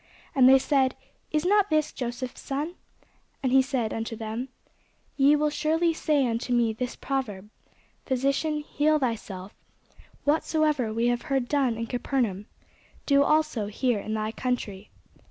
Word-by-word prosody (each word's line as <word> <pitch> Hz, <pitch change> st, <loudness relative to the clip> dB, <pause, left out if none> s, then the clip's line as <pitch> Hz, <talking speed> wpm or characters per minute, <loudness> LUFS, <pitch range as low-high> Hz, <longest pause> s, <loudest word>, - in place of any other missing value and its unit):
And 260 Hz, -2 st, +6 dB
they 270 Hz, -, +8 dB
said, 265 Hz, -1 st, +2 dB, 0.3 s
Is 305 Hz, +1 st, 0 dB
not 410 Hz, +1 st, +3 dB
this 310 Hz, -1 st, +1 dB
Joseph's 245 Hz, +1 st, -5 dB
son? 290 Hz, +5 st, -3 dB, 0.7 s
And 260 Hz, -, +1 dB
he 265 Hz, +1 st, +6 dB
said 260 Hz, -5 st, -1 dB
unto 225 Hz, 0 st, -4 dB
them, 225 Hz, +4 st, -5 dB, 0.7 s
Ye 280 Hz, +1 st, +5 dB
will 300 Hz, 0 st, +1 dB
surely 325 Hz, +3 st, +1 dB
say 300 Hz, -3 st, +1 dB
unto 235 Hz, +1 st, -2 dB
me 235 Hz, -2 st, +2 dB
this 250 Hz, +2 st, -4 dB
proverb, 215 Hz, -7 st, -4 dB, 0.6 s
Physician, 275 Hz, +4 st, 0 dB
heal 300 Hz, +1 st, +1 dB
thyself: 210 Hz, -7 st, -4 dB, 0.7 s
whatsoever 300 Hz, -4 st, +1 dB
we 230 Hz, +2 st, 0 dB
have 240 Hz, 0 st, 0 dB
heard 265 Hz, -3 st, +1 dB
done 265 Hz, -5 st, +1 dB
in 230 Hz, -, -2 dB
Capernaum, 230 Hz, -4 st, -2 dB, 0.6 s
do 280 Hz, -1 st, +4 dB
also 305 Hz, -7 st, +2 dB
here 235 Hz, +1 st, 0 dB
in 215 Hz, +2 st, -4 dB
thy 215 Hz, 0 st, -2 dB
country. 220 Hz, -5 st, -3 dB
260 Hz, 145 wpm, -26 LUFS, 230-295 Hz, 0.7 s, they